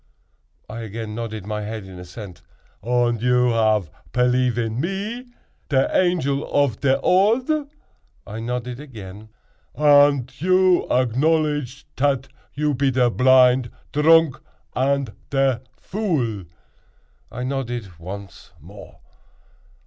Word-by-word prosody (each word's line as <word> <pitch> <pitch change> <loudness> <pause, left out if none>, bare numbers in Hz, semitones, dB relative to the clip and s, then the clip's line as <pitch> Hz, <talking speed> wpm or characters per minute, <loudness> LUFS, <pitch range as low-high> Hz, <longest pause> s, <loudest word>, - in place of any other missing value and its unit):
I 110 +2 -7
again 110 -1 -6
nodded 110 -3 -5
my 105 0 -3
head 105 -1 -6
in 95 -1 -11
assent. 90 +1 -10 0.4
"Und 120 0 +1
you 125 0 +3
ave 110 -6 +2 0.2
pelief 125 0 +2
in 115 0 -2
me, 200 - -3 0.4
te 140 - +1 0.2
Angel 155 -6 +1
of 140 -6 +1
te 135 -1 +3
Odd?" 255 - +2 0.6
I 110 +2 -7
nodded 125 +1 -4
again. 110 -7 -10 0.5
"Und 145 -3 +4
you 185 0 +3
acknowledge 145 +2 0
tat 135 -1 0 0.3
you 150 0 0
pe 135 +1 +1
te 125 -2 +2
blind 125 0 +4 0.2
dronk 160 -1 +4 0.4
and 135 -2 0 0.2
te 135 -3 +2 0.2
vool?" 135 - -2 0.9
I 125 - -5
nodded 120 - -4
once 95 +2 -9
more. - - -14
125 Hz, 110 wpm, -22 LUFS, 115-145 Hz, 0.9 s, Und